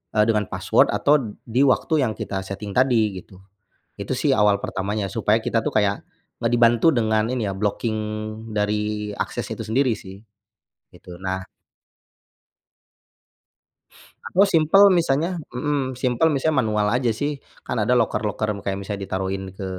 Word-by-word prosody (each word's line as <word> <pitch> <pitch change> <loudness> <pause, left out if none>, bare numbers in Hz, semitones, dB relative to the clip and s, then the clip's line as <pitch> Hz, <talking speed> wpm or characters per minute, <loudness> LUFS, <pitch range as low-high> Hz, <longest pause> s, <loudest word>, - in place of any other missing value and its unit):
eee, 105 - +5
dengan 105 -3 +1
password - - +2
atau 150 +1 +3 0.2
di 120 +4 +1
waktu 155 +4 +2
yang 110 -4 -1
kita 95 - -4
setting 100 +1 -6
tadi 115 -7 +2
gitu. 95 +1 -16 0.6
Itu - - -3
sih - - +2
awal 105 -1 +3
pertamanya, 100 +1 -3
supaya 110 0 +1
kita 115 0 0
tuh - - -1
kayak 100 -1 +1 0.4
nge 115 - +2
dibantu 120 +4 +4
dengan 110 -2 +1
ini 120 -5 -1
ya, 100 - -2
blocking 105 +3 -1 0.6
dari 105 0 -2
akses - - -4
itu - - -6
sendiri 120 +3 +1
sih. 95 0 -11 0.7
Gitu, 90 -1 -12
nah 95 0 -3 2.9
Aku 195 +2 +4
simpel, 180 +4 +6
misalnya 170 -1 +1 0.2
mmm, 135 +1 -1
simpel, 130 +6 +2
misalnya 150 +2 0
manual 105 -1 0
aja 125 -2 +1
sih. 145 +6 -3 0.2
Kan - - -5
ada 110 +2 +1
loker-loker, 110 -3 0
m 100 - -11
kayak 100 0 -2
misalnya 100 0 -5
ditaruhin 95 0 -4
ke, 95 +1 -8
110 Hz, 150 wpm, -22 LUFS, 100-130 Hz, 2.9 s, simpel